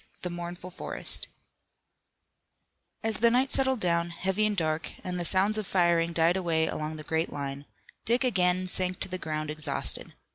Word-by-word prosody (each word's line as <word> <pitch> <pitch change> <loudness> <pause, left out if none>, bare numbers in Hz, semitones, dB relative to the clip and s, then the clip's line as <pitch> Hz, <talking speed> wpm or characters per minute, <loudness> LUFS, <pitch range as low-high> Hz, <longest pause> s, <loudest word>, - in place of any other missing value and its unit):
THE 180 - -3
MOURNFUL 175 +1 -6
FOREST 180 - +1 1.8
As 220 -2 +1
the 235 +3 +5
night 255 +3 +2
settled 265 -2 +2
down, 170 -1 +1
heavy 190 +5 0
and 210 -1 -2
dark, 155 -2 -1
and 180 -1 -3
the 175 - -2
sounds 200 +5 +3
of 210 - -5
firing 170 -2 +2
died 165 +1 +3
away 165 -3 +1
along 155 0 -3
the 155 - -7
great 160 +2 -1
line, 140 0 -5 0.4
Dick 240 +3 +2
again 185 -6 +2
sank 185 0 0
to - - -1
the 185 0 -4
ground 155 -1 -3
exhausted. 155 0 -2
180 Hz, 170 wpm, -28 LUFS, 160-190 Hz, 1.8 s, the